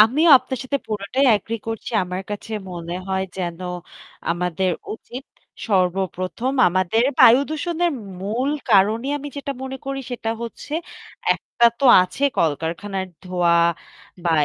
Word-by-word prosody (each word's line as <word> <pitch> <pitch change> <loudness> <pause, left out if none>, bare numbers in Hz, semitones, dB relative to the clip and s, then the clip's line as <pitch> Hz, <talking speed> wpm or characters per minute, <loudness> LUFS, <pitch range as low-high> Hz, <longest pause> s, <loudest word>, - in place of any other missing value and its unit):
আমিও 275 +10 +5
আপনার 260 0 -5
সাথে 280 +2 -1
পুরোটাই 215 +6 -1
এগ্রি 225 +2 -2
করছি। 225 -1 -4
আমার 180 +1 -4
কাছে 205 +2 -6 0.2
মনে 170 -1 -6
হয় 190 0 0
যেন 175 -3 -3 0.7
আমাদের 180 +1 0 0.2
উচিত। 250 +4 -10 0.4
সর্বপ্রথম 185 +4 0 0.2
আমাদের 185 +5 +1 0.2
বায়ুদূষণের 315 +7 +4 0.3
মূল 230 +8 -1 0.2
কারণই 215 +5 +4
আমি 290 +1 -7
যেটা 280 0 -3
মনে 265 0 -5
করি 275 0 -3
সেটা 230 -2 -3
হচ্ছে 235 +5 -8 0.6
একটা 235 - -1
তো 280 - -1 0.2
আছে 185 +9 -6 0.2
কলকারখানার 170 +5 -1 0.2
ধোয়া 180 -2 +2 0.7
বা 170 - +2
205 Hz, 125 wpm, -22 LUFS, 180-260 Hz, 0.7 s, আমিও